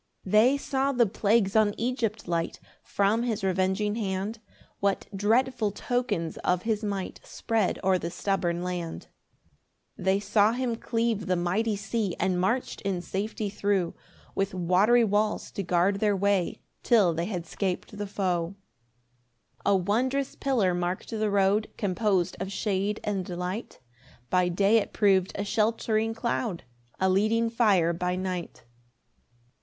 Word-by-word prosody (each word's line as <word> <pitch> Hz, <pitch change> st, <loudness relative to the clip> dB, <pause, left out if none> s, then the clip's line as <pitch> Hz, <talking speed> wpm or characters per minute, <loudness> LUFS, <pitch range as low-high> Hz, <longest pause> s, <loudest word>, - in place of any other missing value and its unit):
3 185 Hz, -, -7 dB
They 240 Hz, +6 st, +5 dB
saw 275 Hz, 0 st, 0 dB
the 245 Hz, -3 st, +3 dB
plagues 205 Hz, 0 st, +1 dB
on 215 Hz, -2 st, +4 dB
Egypt 230 Hz, -4 st, -2 dB
light, 170 Hz, -1 st, -2 dB, 0.2 s
From 205 Hz, +3 st, +1 dB
his 225 Hz, -4 st, -2 dB
revenging 190 Hz, +2 st, +1 dB
hand: 205 Hz, 0 st, -3 dB, 0.4 s
What 200 Hz, -1 st, 0 dB
dreadful 225 Hz, +3 st, +2 dB
tokens 205 Hz, -6 st, -2 dB
of 180 Hz, 0 st, 0 dB
his 220 Hz, -1 st, -1 dB
might 200 Hz, -3 st, -3 dB
Spread 225 Hz, -4 st, -1 dB
o'er 185 Hz, -1 st, +3 dB
the 170 Hz, -, -3 dB
stubborn 175 Hz, -2 st, -1 dB
land! 175 Hz, -2 st, -5 dB, 0.9 s
4 185 Hz, -, -8 dB
They 190 Hz, +1 st, +3 dB
saw 210 Hz, +1 st, +3 dB
him 245 Hz, -1 st, -1 dB
cleave 230 Hz, -3 st, -1 dB
the 185 Hz, -, +2 dB
mighty 195 Hz, +6 st, 0 dB
sea, 200 Hz, -1 st, -2 dB
And 180 Hz, -1 st, +1 dB
march'd 235 Hz, +7 st, -1 dB
in 190 Hz, -3 st, -2 dB
safety 210 Hz, +3 st, -3 dB
thro', 200 Hz, -3 st, 0 dB, 0.4 s
With 195 Hz, -1 st, -1 dB
watery 190 Hz, +7 st, +4 dB
walls 210 Hz, 0 st, 0 dB
to -, -, -3 dB
guard 180 Hz, +2 st, +2 dB
their 210 Hz, -1 st, +2 dB
way, 195 Hz, -2 st, 0 dB, 0.2 s
Till 205 Hz, -8 st, +4 dB
they 165 Hz, +2 st, -2 dB
had 180 Hz, -5 st, -4 dB
'scap'd 190 Hz, +3 st, -3 dB
the 205 Hz, 0 st, -4 dB
foe. 185 Hz, -2 st, -1 dB, 1.1 s
5 -, -, +4 dB
A -, -, +5 dB
wondrous 255 Hz, +9 st, 0 dB
pillar 230 Hz, -10 st, +1 dB
mark'd 175 Hz, +4 st, -3 dB
the 215 Hz, -1 st, 0 dB
road, 200 Hz, +2 st, +2 dB
Compos'd 190 Hz, -2 st, 0 dB
of 190 Hz, +1 st, -3 dB
shade 200 Hz, +1 st, -1 dB
and 195 Hz, -3 st, -2 dB
light; 180 Hz, +5 st, -4 dB, 0.5 s
By 180 Hz, -1 st, +3 dB
day 200 Hz, +5 st, +3 dB
it 220 Hz, -, -1 dB
prov'd 195 Hz, -3 st, +3 dB
a 200 Hz, -, -2 dB
sheltering 220 Hz, +1 st, 0 dB
cloud, 225 Hz, -5 st, -2 dB, 0.4 s
A 190 Hz, -, +3 dB
leading 220 Hz, +4 st, +2 dB
fire 200 Hz, -8 st, +3 dB
by 180 Hz, +1 st, -1 dB
night. 185 Hz, -6 st, -4 dB
200 Hz, 150 wpm, -27 LUFS, 185-220 Hz, 1.1 s, They